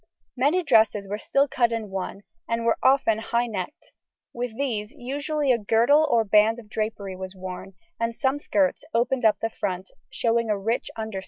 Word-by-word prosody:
Many 290 Hz, +8 st, +2 dB
dresses 220 Hz, -7 st, +3 dB
were 205 Hz, +2 st, -4 dB
still 275 Hz, +5 st, +2 dB
cut 240 Hz, -3 st, +1 dB
in 220 Hz, -3 st, -3 dB
one, 190 Hz, +1 st, -4 dB, 0.3 s
and 230 Hz, 0 st, -1 dB
were 230 Hz, -, +2 dB
often 260 Hz, -5 st, +3 dB
high 235 Hz, +1 st, 0 dB
necked; 200 Hz, -6 st, -6 dB, 0.4 s
with 240 Hz, -2 st, -4 dB
these 225 Hz, -6 st, -2 dB
usually 285 Hz, +1 st, -1 dB
a 240 Hz, -, +2 dB
girdle 235 Hz, +9 st, +4 dB
or 230 Hz, -1 st, +4 dB
band 215 Hz, +2 st, +4 dB
of 220 Hz, -3 st, -13 dB
drapery 210 Hz, -3 st, -3 dB
was 185 Hz, +1 st, -7 dB
worn, 185 Hz, +1 st, -8 dB, 0.2 s
and 230 Hz, 0 st, -1 dB
some 270 Hz, +2 st, 0 dB
skirts 290 Hz, -1 st, +1 dB
opened 245 Hz, +1 st, +1 dB
up 210 Hz, -2 st, +5 dB
the 225 Hz, -, -1 dB
front, 185 Hz, -3 st, -4 dB, 0.2 s
showing 230 Hz, -1 st, 0 dB
a 210 Hz, -, +1 dB
rich 225 Hz, +4 st, -1 dB
underskirt. 220 Hz, -3 st, -4 dB
225 Hz, 180 wpm, -25 LUFS, 210-255 Hz, 0.4 s, up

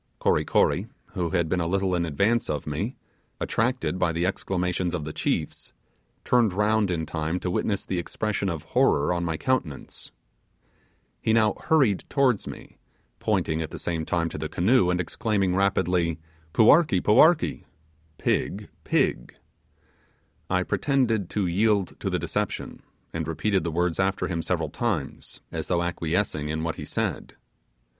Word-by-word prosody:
Kory -, -, +2 dB
Kory, -, -, +2 dB, 0.3 s
who 85 Hz, -2 st, -1 dB
had 85 Hz, -2 st, +1 dB
been 90 Hz, +3 st, 0 dB
a 85 Hz, -, -1 dB
little 95 Hz, +1 st, 0 dB
in 85 Hz, -1 st, 0 dB
advance 100 Hz, +10 st, +1 dB
of 75 Hz, -2 st, -2 dB
me, 80 Hz, -, -3 dB, 0.4 s
attracted 120 Hz, -5 st, 0 dB
by 85 Hz, -, +2 dB
the 85 Hz, +2 st, -1 dB
exclamations 90 Hz, -2 st, -1 dB
of 80 Hz, -, -3 dB
the 75 Hz, -, -5 dB
chiefs, -, -, -2 dB, 0.5 s
turned 120 Hz, -6 st, +3 dB
round 105 Hz, +1 st, +2 dB
in 80 Hz, -3 st, -1 dB
time 80 Hz, +3 st, -2 dB
to 90 Hz, -, -2 dB
witness 100 Hz, +2 st, -1 dB
the 90 Hz, -, -2 dB
expression 100 Hz, +2 st, -2 dB
of 80 Hz, -4 st, -4 dB
horror 70 Hz, +4 st, +2 dB
on 85 Hz, 0 st, -1 dB
my 80 Hz, -2 st, -1 dB
countenance. 105 Hz, -, -2 dB, 1.1 s
He 110 Hz, -, +2 dB
now 110 Hz, -2 st, +4 dB
hurried 130 Hz, -12 st, +2 dB
towards 130 Hz, -6 st, +2 dB
me, -, -, -10 dB, 0.4 s
pointing 80 Hz, +1 st, 0 dB
at 80 Hz, -, -4 dB
the -, -, -7 dB
same 80 Hz, -2 st, -2 dB
time 85 Hz, +1 st, 0 dB
to -, -, -6 dB
the -, -, -3 dB
canoe, 95 Hz, +2 st, +3 dB
and 90 Hz, 0 st, +1 dB
exclaiming 95 Hz, +1 st, 0 dB
rapidly, 90 Hz, -4 st, +1 dB, 0.3 s
'Puarkee! 115 Hz, -, +5 dB
puarkee!' 155 Hz, +10 st, +4 dB, 0.5 s
(Pig, -, -, -1 dB
pig). -, -, 0 dB, 1.1 s
I 90 Hz, 0 st, +2 dB
pretended 115 Hz, -6 st, +1 dB
to 105 Hz, -2 st, -1 dB
yield 100 Hz, +2 st, +1 dB
to -, -, -2 dB
the -, -, 0 dB
deception, -, -, -3 dB, 0.3 s
and 80 Hz, -2 st, -3 dB
repeated 95 Hz, +4 st, 0 dB
the 85 Hz, -, -1 dB
words 85 Hz, +1 st, 0 dB
after 95 Hz, 0 st, +1 dB
him 85 Hz, -2 st, -2 dB
several 80 Hz, -2 st, -1 dB
times, -, -, -3 dB
as -, -, -4 dB
though 85 Hz, -1 st, +1 dB
acquiescing 85 Hz, -2 st, -1 dB
in 80 Hz, +1 st, -2 dB
what 80 Hz, -1 st, -2 dB
he -, -, -6 dB
said. -, -, -3 dB
90 Hz, 155 wpm, -26 LUFS, 85-105 Hz, 1.1 s, Puarkee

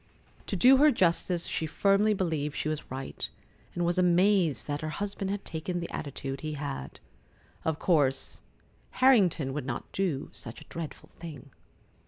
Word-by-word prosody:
To -, -, -2 dB
do 255 Hz, +8 st, +7 dB
her 300 Hz, +3 st, +7 dB
justice, 175 Hz, -, +2 dB
she 160 Hz, -, -2 dB
firmly 200 Hz, +5 st, +3 dB
believed 155 Hz, -6 st, -1 dB
she 145 Hz, -, -2 dB
was 155 Hz, -1 st, -3 dB
right, 130 Hz, +1 st, -4 dB, 0.5 s
and 175 Hz, -, 0 dB
was 175 Hz, +1 st, +1 dB
amazed 180 Hz, -, +3 dB
that 145 Hz, 0 st, -3 dB
her 155 Hz, -, -3 dB
husband 195 Hz, +4 st, -3 dB
had 200 Hz, 0 st, -3 dB
taken 170 Hz, +2 st, -3 dB
the 170 Hz, -, -5 dB
attitude 135 Hz, -1 st, -5 dB
he 155 Hz, -1 st, -3 dB
had. 140 Hz, -, -5 dB, 0.6 s
Of 160 Hz, -2 st, 0 dB
course 145 Hz, -8 st, +1 dB, 0.6 s
Harrington 190 Hz, -, +4 dB
would 140 Hz, -2 st, -4 dB
not 120 Hz, -, -4 dB
do 175 Hz, -8 st, -1 dB
such 115 Hz, 0 st, -5 dB
a -, -, -12 dB
dreadful 165 Hz, -2 st, -7 dB
thing. 155 Hz, -4 st, -9 dB
165 Hz, 160 wpm, -29 LUFS, 145-190 Hz, 0.6 s, do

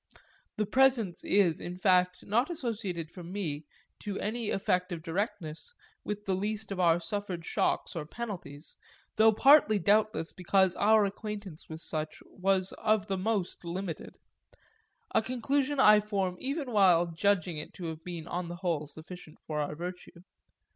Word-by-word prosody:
That 210 Hz, -1 st, -1 dB
presence 255 Hz, -9 st, +3 dB
is 190 Hz, -6 st, +3 dB
in 180 Hz, +1 st, -6 dB
fact 180 Hz, -1 st, +3 dB
not 235 Hz, -, +1 dB
associated 210 Hz, -, -4 dB
for 180 Hz, -, -10 dB
me, 170 Hz, -5 st, -4 dB, 0.3 s
to 200 Hz, -1 st, -4 dB
any 220 Hz, +1 st, -2 dB
effect 180 Hz, -1 st, 0 dB
of 165 Hz, -2 st, -5 dB
distinctness, 185 Hz, -, -4 dB, 0.3 s
with 210 Hz, 0 st, -4 dB
the 195 Hz, -, 0 dB
least 205 Hz, +2 st, -3 dB
of 195 Hz, -, -3 dB
our 170 Hz, -1 st, +4 dB
suffered 180 Hz, -1 st, -4 dB
shocks -, -, 0 dB
or 155 Hz, -3 st, -4 dB
penalties 175 Hz, -9 st, -7 dB, 0.4 s
though 220 Hz, +1 st, +7 dB
partly 270 Hz, -1 st, +6 dB
doubtless 205 Hz, -2 st, +2 dB
because 190 Hz, 0 st, +2 dB
our 215 Hz, 0 st, +4 dB
acquaintance 200 Hz, -4 st, -6 dB
with 160 Hz, 0 st, -7 dB
such 155 Hz, -1 st, -4 dB
was 190 Hz, 0 st, 0 dB
of 215 Hz, -2 st, +2 dB
the 195 Hz, -2 st, -2 dB
most 200 Hz, -3 st, -1 dB
limited; 170 Hz, -1 st, -5 dB, 1.0 s
a -, -, +4 dB
conclusion 265 Hz, +4 st, 0 dB
I 210 Hz, -4 st, +8 dB
form 200 Hz, -3 st, -1 dB
even 275 Hz, -1 st, -3 dB
while 185 Hz, -5 st, +5 dB
judging 175 Hz, 0 st, 0 dB
it 150 Hz, -, -8 dB
to 180 Hz, -, -7 dB
have 160 Hz, -1 st, -6 dB
been 170 Hz, -3 st, -6 dB
on 180 Hz, 0 st, -3 dB
the 175 Hz, -, -6 dB
whole 170 Hz, -4 st, -2 dB
sufficient 160 Hz, +2 st, -11 dB
for 150 Hz, -1 st, -4 dB
our 150 Hz, 0 st, -2 dB
virtue. 175 Hz, +1 st, -8 dB
190 Hz, 155 wpm, -30 LUFS, 170-215 Hz, 1.0 s, I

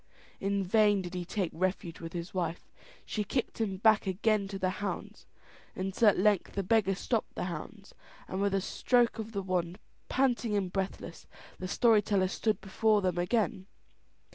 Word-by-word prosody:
In 200 Hz, 0 st, 0 dB
vain 205 Hz, 0 st, +3 dB
did 175 Hz, 0 st, -7 dB
he 180 Hz, -1 st, -3 dB
take 185 Hz, -1 st, -2 dB
refuge 180 Hz, -1 st, -2 dB
with 165 Hz, -1 st, -7 dB
his 170 Hz, 0 st, -5 dB
wife, 175 Hz, -2 st, -3 dB, 0.3 s
she 210 Hz, -, -2 dB
kicked 235 Hz, +2 st, -2 dB
him 195 Hz, -4 st, -1 dB
back 215 Hz, 0 st, +4 dB
again 200 Hz, +2 st, +1 dB
to 195 Hz, 0 st, -5 dB
the 185 Hz, -1 st, 0 dB
hounds, 205 Hz, -, -5 dB, 0.5 s
until 195 Hz, +4 st, +3 dB
at 200 Hz, -, +1 dB
length 205 Hz, -1 st, +2 dB
the 200 Hz, -, -1 dB
beggar 195 Hz, -1 st, +2 dB
stopped 225 Hz, +3 st, -2 dB
the -, -, -3 dB
hounds, 185 Hz, +4 st, -7 dB, 0.3 s
and 190 Hz, -, -3 dB
with 200 Hz, -1 st, +1 dB
a 195 Hz, -, +1 dB
stroke 240 Hz, +3 st, +2 dB
of 220 Hz, 0 st, -5 dB
the 200 Hz, -3 st, -3 dB
wand, 180 Hz, -1 st, -1 dB, 0.3 s
panting 240 Hz, -5 st, +1 dB
and 185 Hz, -3 st, -2 dB
breathless, 190 Hz, -3 st, -4 dB, 0.3 s
the 185 Hz, -, -4 dB
story 220 Hz, +2 st, +4 dB
teller 195 Hz, -2 st, +1 dB
stood 215 Hz, 0 st, 0 dB
before 210 Hz, +1 st, +2 dB
them 180 Hz, -2 st, 0 dB
again. 190 Hz, 0 st, 0 dB
195 Hz, 175 wpm, -30 LUFS, 185-215 Hz, 0.5 s, back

